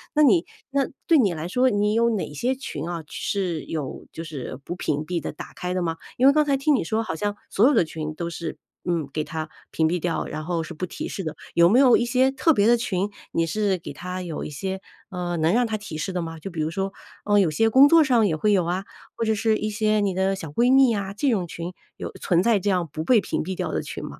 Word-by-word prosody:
那 305 - +4
你 330 +4 +5 0.3
那 280 - +2 0.2
对 330 - +5
你 200 -9 +3
来 155 +1 -4
说， 250 +7 +3
你 210 -1 +1
有 230 +1 +3
哪 205 -9 -2
些 250 - 0
群 160 - -6
啊？ 170 -2 -4
是 180 -2 -2
有 150 -5 -5
就 165 - -7
是 140 -4 -6
不 175 - -4
屏 150 -3 -2
蔽 175 -1 -2
的、 - - -4
打 150 - -10
开 180 0 -3
的 185 - -1
吗？ 165 -2 -1 0.2
因 260 - +5
为 280 - +7
刚 305 - +4
才 280 -2 +1
听 285 +2 +3
你 250 - 0
说 220 +6 0
好 160 - -4
像， 205 +3 -2
所 210 - +3
有 - - +3
的 170 - +4
群 155 -1 -5
都 170 +1 -3
是， 165 -2 -5 0.3
嗯， 170 -5 -1
给 155 - -1
它 155 0 -5 0.2
屏 160 - +2
蔽 175 +3 0
掉， 170 0 -2
然 155 - -5
后 170 0 -1
是 160 - -7
不 170 +3 -4
提 175 - -6
示 195 - -5
的， 155 -2 -3 0.2
有 170 0 +6
没 245 +5 +5
有 260 -3 +7
一 - - +2
些 255 +2 +3
特 320 +4 +3
别 205 -5 +3
的 240 - +6
群， 200 -4 -1 0.2
你 165 - +1
是 200 +3 0
给 165 - -8
它 180 +1 -5
有 170 -4 -5
一 - - -5
些 190 +6 -4 0.3
呃， 175 -2 -3
能 160 +2 +2
让 245 +1 +3
它 220 -1 -2
提 205 -7 -7
示 190 +5 -3
的 180 - -2
吗？ 165 -1 -6
就 175 +5 -7
比 170 - -6
如 155 - 0
说， 195 +3 -2 0.3
呃， 205 0 +3
有 185 -5 +3
些 225 +9 +2
工 265 +5 +8
作 330 +1 +6
上 240 -6 +3
也 165 - 0
会 210 +7 +1
有 190 -4 +3
啊， 180 +3 -1 0.3
或 - - -2
者 220 -1 +2
是 220 +1 +2
一 215 - -2
些 215 0 +1
你 200 -2 +1
的 190 +1 +1
小 165 -5 -7
闺 240 - +3
蜜 270 -2 +6
呀？ 200 -3 -2
这 265 +7 0
种 190 -7 0
群 170 +2 -6 0.2
有 - - -6
存 175 0 +2
在 230 -3 +3
这 205 - -1
样 180 -4 0
不 155 +1 -4
被 225 +2 +5
屏 - - -2
蔽 190 +3 -4
掉 - - -3
的 - - -1
群 - - -7
吗？ - - -8
190 Hz, 295 characters per minute, -24 LUFS, 165-225 Hz, 0.3 s, 工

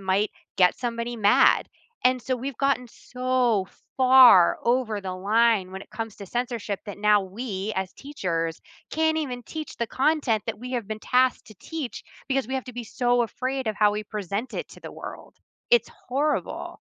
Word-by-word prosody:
might 195 +2 +1 0.3
get 180 -1 +4
somebody 235 0 -3
mad, 205 -2 +4 0.4
and, 255 0 +4
so, 255 +2 -1
we've 255 0 -5
gotten 275 -3 +1
so 250 -5 0 0.3
far 255 -9 +8
over 235 -3 +1
the 185 -1 -4
line 205 +1 +2
when 190 +1 -7
it - - -17
comes 225 -2 -6
to 200 - -8
censorship 235 -3 -3
that 205 - -6
now, 210 0 +4
we, 200 +1 -4
as 190 -1 -2
teachers, 170 - -3 0.3
can't 315 0 +1
even 250 -5 -4
teach 310 +5 -7
the 235 - -1
content 265 -4 +1
that - - -3
we 250 +3 -7
have 235 -5 -3
been 215 0 -4
tasked 255 +2 +2
to 215 - -13
teach 305 -8 -5 0.3
because 270 -3 0
we 265 - -3
have 265 - -2
to 250 - -9
be 240 -1 -6
so 245 +2 +1
afraid 255 +3 -3
of 215 -1 -1
how 210 -1 +5
we 210 +1 -3
present 205 +3 -4
it - - -3
to - - -14
the - - -8
world. - - -9 0.4
It's 480 0 +4 0.2
horrible. 290 +4 -1
235 Hz, 185 wpm, -25 LUFS, 205-255 Hz, 0.4 s, far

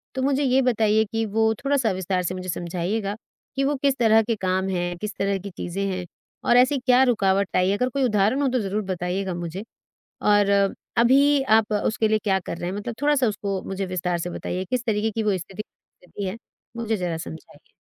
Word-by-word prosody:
तो 260 - -1
मुझे 280 +1 +1
ये 265 0 +3
बताइए 220 -3 +3
कि 225 0 0
वो 220 +1 +2
थोड़ा-सा 275 -6 +2
विस्तार 185 0 -1
से 180 +1 -2
मुझे 185 0 -6
समझाइएगा 180 +5 -2 0.4
कि 275 - 0
वो 285 +2 +1
किस 275 -1 +2
तरह 225 -2 +5
के 230 +1 -1
काम 190 -1 -1
हैं, 175 -1 -2
किस 210 +2 -5
तरह 195 0 0
की 200 +2 -7
चीज़ें 195 +3 -3
हैं 185 -1 -4 0.4
और 240 - +6
ऐसी 260 +3 +4
क्या 255 +1 +4
रुकावट 200 -5 +1
आई 185 +1 +3
है? 200 - +1
अगर 250 +2 0
कोई 275 +1 -1
उदाहरण 215 +3 +2
हो - - +2
तो 255 0 0
ज़रूर 205 +2 -2
बताइएगा 185 0 -2
मुझे 175 +3 -5 0.6
और 205 -1 +4 0.5
अभी 275 +4 +5 0.2
आप 215 -1 -1
अ, 210 - +1
उसके 220 0 +1
लिए 215 0 +2
क्या 195 -2 +2
कर 170 - -6
रहे 175 - -3
हैं? 190 - -5
मतलब 230 +3 -5
थोड़ा-सा 290 -3 +3
उसको 200 -2 -3
मुझे 195 0 -3
विस्तार 180 -1 -2
से 175 +1 -4
बताइए, 185 +2 -4
किस 250 +5 -2
तरीक़े 220 0 +1
की 220 +1 -2
वो 205 -3 +1
स्थिति 195 +4 -7
गुज़र 180 - -29
रही 200 - -1
है 190 - -5 0.4
मुझे 225 -2 -1
जरा 175 -3 -2
समझाइए? 160 0 -11
205 Hz, 220 wpm, -24 LUFS, 185-235 Hz, 0.6 s, और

